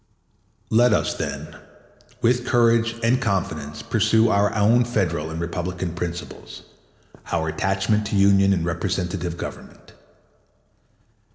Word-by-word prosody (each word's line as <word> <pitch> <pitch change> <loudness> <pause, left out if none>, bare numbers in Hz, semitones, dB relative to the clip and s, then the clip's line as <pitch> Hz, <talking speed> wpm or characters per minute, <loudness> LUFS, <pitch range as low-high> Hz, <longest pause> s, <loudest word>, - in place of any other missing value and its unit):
2 110 - +3
Let 120 -1 +5
us, - - +1
then, - - -6 0.7
with 125 +1 +2
courage 115 -1 +3
and 120 +2 +2
confidence 80 -8 -3
pursue 110 +1 +2
our 100 -1 +2
own 110 +4 +4
Federal 90 -10 -1
and 80 0 -5
Republican 85 +1 -4
principles, 85 0 -7 0.7
our 80 -2 0
attachment 100 +6 0
to 105 - -3
union 100 0 +4
and 85 -4 0
representative 90 0 -3
government. - - -9
100 Hz, 115 wpm, -22 LUFS, 85-110 Hz, 0.7 s, Let